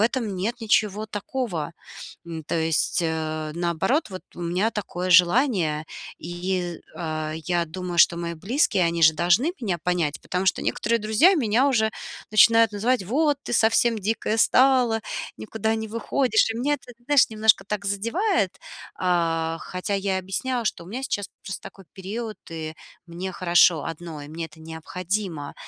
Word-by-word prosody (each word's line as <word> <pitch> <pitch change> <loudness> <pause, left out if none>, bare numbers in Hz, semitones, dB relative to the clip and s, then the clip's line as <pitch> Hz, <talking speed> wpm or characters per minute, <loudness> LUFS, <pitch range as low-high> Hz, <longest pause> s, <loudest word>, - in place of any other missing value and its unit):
этом 225 -2 0
нет 225 +7 -2
ничего 215 -1 +1
такого. 210 - -4 0.5
М, 165 -1 -6
то - - -3
есть, 160 +2 +1
э, 155 -1 -2
наоборот, 175 - 0
вот 185 - -7
у - - -10
меня 180 +6 0
такое 185 -3 -4
желание. 175 - +4 0.3
И, 175 +1 -3 0.2
э, 155 -2 -3
я 170 +1 -1
думаю, 175 +1 -5
что 170 - +6
мои 170 0 -3
близкие, 195 - +1
они 170 0 -1
же 160 0 +8
должны 180 - +2
меня 195 -7 -1
понять. 170 -3 -1
Потому 185 +1 -2
что - - +2
некоторые 230 +2 0
друзья 220 - +4
меня 245 -2 +2
уже 220 -4 +2 0.4
начинают 225 0 +6
называть: 235 +3 +1
"Вот 290 - +1
ты - - -6
совсем 230 0 +3
дикая 220 +2 -1
стала, 250 -2 +4 0.4
никуда 220 0 -2
не 220 0 -3
выходишь!" 230 +1 +1
И 225 - -3
меня 285 +5 +1
это, 245 -3 -11
знаешь, 290 -1 +4
немножко 215 -2 +3
так 200 0 -4
задевает. 230 - 0 0.4
А, 165 -2 0
хотя 185 +2 -4
я 195 -1 0
объясняла, 235 +6 -2
что 170 - -2
у - - -15
меня 245 +7 -5
сейчас 205 -7 -2 0.2
просто 190 - -5
такой 195 - -12
период, 215 +2 -6
и 160 -1 -5 0.3
мне 180 +2 -6
хорошо 175 -3 +4
одной, 160 -3 -7
мне 165 +2 -5
это 160 - -18
необходимо. 165 0 -4
195 Hz, 155 wpm, -24 LUFS, 170-225 Hz, 0.5 s, же